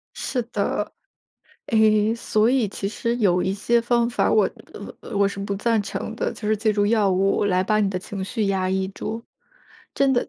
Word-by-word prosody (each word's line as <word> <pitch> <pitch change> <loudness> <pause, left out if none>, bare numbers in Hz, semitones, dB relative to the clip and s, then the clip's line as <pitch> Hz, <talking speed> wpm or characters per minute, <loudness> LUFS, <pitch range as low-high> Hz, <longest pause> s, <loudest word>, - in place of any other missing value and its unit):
是 250 - -2
的。 - - -1 0.8
诶， 215 -1 +3
所 220 -1 +1
以 255 -5 +2
其 195 0 -4
实 235 +3 -2
有 185 -6 +2
一 190 +1 0
些 235 +4 +2
方 235 0 +1
法 - - +1
我 - - +4 0.3
呃 - - -9
呃， 220 - -7
我 200 0 +4
是 200 - -8
不 200 0 -3
赞 225 +2 +1
成 205 +2 -5
的。 - - -1
就 210 - -5
是 215 - +2
借 215 +1 +1
助 205 -1 +1
药 210 -2 +3
物 195 +2 +2
来 185 -2 +2
把 215 +2 +1
你 205 - +2
的 190 -1 -2
情 195 +1 -6
绪 215 +1 -2
压 190 -1 0
抑 190 0 0
住， 220 +3 -5 0.7
真 275 -1 +3
的 245 - 0
210 Hz, 220 characters per minute, -23 LUFS, 195-230 Hz, 0.8 s, 我